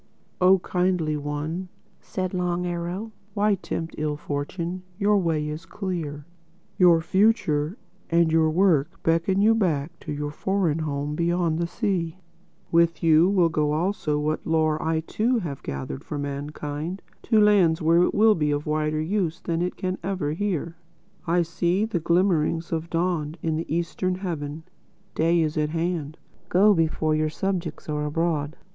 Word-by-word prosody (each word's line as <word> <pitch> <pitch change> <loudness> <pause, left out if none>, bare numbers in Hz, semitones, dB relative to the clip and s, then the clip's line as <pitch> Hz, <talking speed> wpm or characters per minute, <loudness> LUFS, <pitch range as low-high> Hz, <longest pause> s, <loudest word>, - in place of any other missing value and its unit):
"Oh 185 +1 +7
Kindly 180 -4 0
One," 150 +5 -4 0.3
said 185 0 -4
Long 180 -1 -1
Arrow, 175 +5 -4 0.2
"why 210 0 +3
tempt 165 -3 -4
ill 150 -1 -1
fortune? 170 +6 -4 0.2
Your 205 0 +3
way 160 -4 0
is 155 +2 -6
clear. 165 -7 -4 0.5
Your 175 -3 +6
future 185 -3 +2 0.3
and 170 -1 +3
your 160 -1 +4
work 160 -4 +2
beckon 170 +4 +2
you 225 +1 +6
back 165 -8 0
to 150 - -7
your 145 0 -3
foreign 180 -2 0
home 145 -1 -2
beyond 170 0 0
the 170 - 0
sea. 175 -2 -2 0.5
With 170 0 +3
you 165 +2 +5
will 180 -4 +3
go 150 -2 0
also 160 -2 0
what 150 +1 -1
lore 155 -1 +2
I 160 0 0
too 230 +9 0
have 155 - -4
gathered 65 -1 -5
for 150 - -5
mankind—to 150 - -3
lands 195 -6 +5
where 165 +1 +4
it - - +2
will 215 +1 +6
be 150 -5 0
of 145 0 -1
wider 155 0 0
use 175 0 -1
than 170 -2 -2
it 180 +1 -1
can 185 0 -3
ever 175 -5 -2
here. 170 -3 -2 0.5
I 175 +1 +3
see 175 +4 0
the 220 -6 -2
glimmerings 170 -1 +1
of 165 0 -2
dawn 165 -3 -1
in 160 -1 0
the 160 0 -4
eastern 170 +2 -1
heaven. 160 -5 -5 0.5
Day 165 +1 +2
is 155 0 0
at 150 0 +1
hand. 165 -2 -2 0.3
Go 205 +4 +5
before 160 -2 +1
your 155 0 +1
subjects 175 -1 -3
are 150 -1 -2
abroad. 155 -1 -1
165 Hz, 155 wpm, -25 LUFS, 155-185 Hz, 0.5 s, Oh